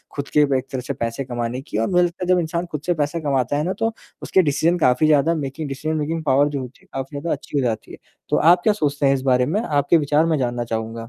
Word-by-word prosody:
खुद 140 -1 -4
के - - +8 0.2
एक 130 - -5
तरह 130 -2 -3
से - - -4
पैसे 115 +3 -3
कमाने 120 0 -3
की 135 - -6
और 115 - +1
मुझे 180 -1 +4
लगता 175 +1 -3
है - - -8
जब 180 - +3
इंसान 170 +1 -2
खुद 150 -1 -4
से 175 - +2
पैसे 150 +1 -1
कमाता 140 -2 0
है 150 - 0
ना, 185 +4 -1
तो 225 +2 -1 0.3
उसके 190 - +3
डिसीज़न 165 +2 +1
काफ़ी 140 0 +3
ज़्यादा 155 +2 +3
मेकिंग 145 0 -4
डिसीज़न, 155 +3 -3
मेकिंग 160 +2 -2
पावर 140 0 +3
जो 140 -2 -3
होती 125 +1 -10
है, - - -25
काफ़ी 135 +2 -5
ज़्यादा 165 +3 -3
अच्छी - - -6
हो - - 0
जाती 110 -2 -3
है। - - -9 0.3
तो - - +2
आप 175 +3 +5
क्या 215 - +4
सोचते 145 -7 -1
हैं 135 - +5
इस 135 - -1
बारे 125 -2 +3
में? 195 - 0
आपके 145 - +2
विचार 150 +1 +2
मैं 160 -2 +1
जानना 120 -1 -1
चाहूँगा। 115 -1 -4
145 Hz, 275 wpm, -21 LUFS, 130-165 Hz, 0.3 s, के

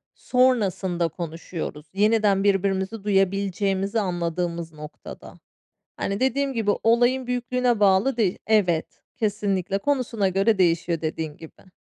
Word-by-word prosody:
Sonrasında 200 -9 +1
konuşuyoruz. 165 -1 -6
Yeniden 205 -1 +3
birbirimizi 195 +1 0
duyabileceğimizi 195 +1 0
anladığımız 170 -3 -3
noktada. 150 0 -11 0.6
Hani, 200 +3 -3
dediğim 270 +1 +1
gibi 225 -4 0
olayın 240 +3 +3
büyüklüğüne 245 -1 0
bağlı 200 +6 +3
değil 205 -6 +1
Evet. 180 -7 +1
Kesinlikle. 200 -3 -1
Konusuna 235 -4 0
göre 195 +3 +2
değişiyor 170 -1 +1
dediğin 155 -1 -4
gibi. 165 +3 -15
195 Hz, 105 wpm, -24 LUFS, 175-225 Hz, 0.6 s, Yeniden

